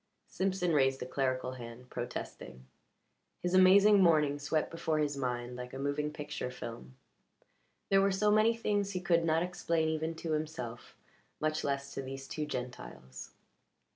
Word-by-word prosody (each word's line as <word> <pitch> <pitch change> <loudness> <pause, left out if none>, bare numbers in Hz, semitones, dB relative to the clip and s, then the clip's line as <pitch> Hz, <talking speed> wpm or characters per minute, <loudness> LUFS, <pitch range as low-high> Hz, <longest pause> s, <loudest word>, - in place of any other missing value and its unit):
Simpson 190 -2 0
raised 135 -3 +2
a - - -6
clerical 130 -1 -1
hand, 125 0 -10
protesting. 65 - -6 0.8
His 180 0 0
amazing 195 +2 +7
morning 150 -5 +4
swept 150 +2 -1
before 165 -1 -1
his 145 -1 0
mind 125 -2 -3
like 125 +1 -7
a - - -4
moving 145 +2 -1
picture 150 -4 -5
film; 115 - -8 0.9
there 195 0 +5
were 195 0 +3
so 210 +2 +2
many 220 +2 +4
things 205 -3 0
he 180 - -1
could 175 -2 +2
not 165 0 +2
explain 170 -3 0
even 160 +1 -2
to 160 0 -4
himself, 150 -7 -4 0.4
much 155 0 0
less 140 0 -2
to - - -3
these 135 0 -7
two 150 -1 -3
Gentiles. 65 - -7
150 Hz, 155 wpm, -32 LUFS, 130-175 Hz, 0.9 s, amazing